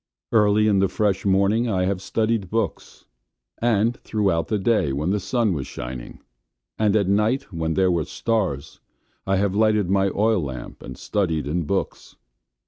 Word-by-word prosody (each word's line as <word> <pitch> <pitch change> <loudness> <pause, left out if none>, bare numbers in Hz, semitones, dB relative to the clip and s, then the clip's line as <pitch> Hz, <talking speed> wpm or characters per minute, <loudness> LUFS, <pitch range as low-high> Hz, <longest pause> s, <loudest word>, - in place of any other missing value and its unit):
Early 105 -1 +4
in 100 -2 +3
the 95 - +3
fresh 100 0 0
morning 100 +5 +2
I 95 -3 +1
have 95 -1 -1
studied 110 +1 0
in - - -14
books, 115 +5 -3 0.5
and 115 0 +1
throughout 95 -7 0
the 110 - 0
day 100 -7 +1
when 75 +7 -1
the 105 - +1
sun 115 0 0
was 70 -5 -4
shining; - - -8 0.6
and 105 -1 +2
at 100 -3 +2
night 105 +4 +1
when 80 -1 -2
there 95 -1 +3
were 85 -3 0
stars, 95 -11 -2 0.5
I 95 - +2
have 100 0 +1
lighted 105 -3 +2
my 100 0 +3
oil 110 +1 +1
lamp 65 -5 -7
and 65 - -9
studied 80 -8 -1
in 80 +3 -1
books. 95 +5 -3
100 Hz, 170 wpm, -23 LUFS, 85-110 Hz, 0.6 s, Early